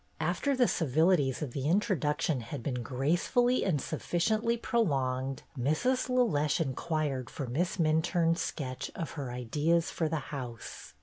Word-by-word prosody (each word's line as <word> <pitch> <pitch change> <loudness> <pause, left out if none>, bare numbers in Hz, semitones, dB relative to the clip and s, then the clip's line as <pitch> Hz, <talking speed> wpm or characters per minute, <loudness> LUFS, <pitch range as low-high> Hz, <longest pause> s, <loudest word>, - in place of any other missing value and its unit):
After 220 - 0
the 250 -2 +5
civilities 155 -2 +2
of 140 - -4
the 140 +1 -1
introduction 160 - +1
had 115 0 -6
been 125 -2 -2
gracefully 175 - +1
and 170 -7 +1
sufficiently 220 - 0
prolonged, 135 - 0
Mrs. 155 - +1
LeLeche 210 - +2
inquired 145 -3 -1
for 140 - -5
Miss 170 +11 -1
Minturne's 165 +1 +2
sketch 130 -4 -4
of 165 -4 -4
her 135 -5 -5
ideas 150 +8 0
for 160 -2 -1
the 160 - -1 0.2
house. 120 - -7
155 Hz, 135 wpm, -30 LUFS, 135-180 Hz, 0.2 s, the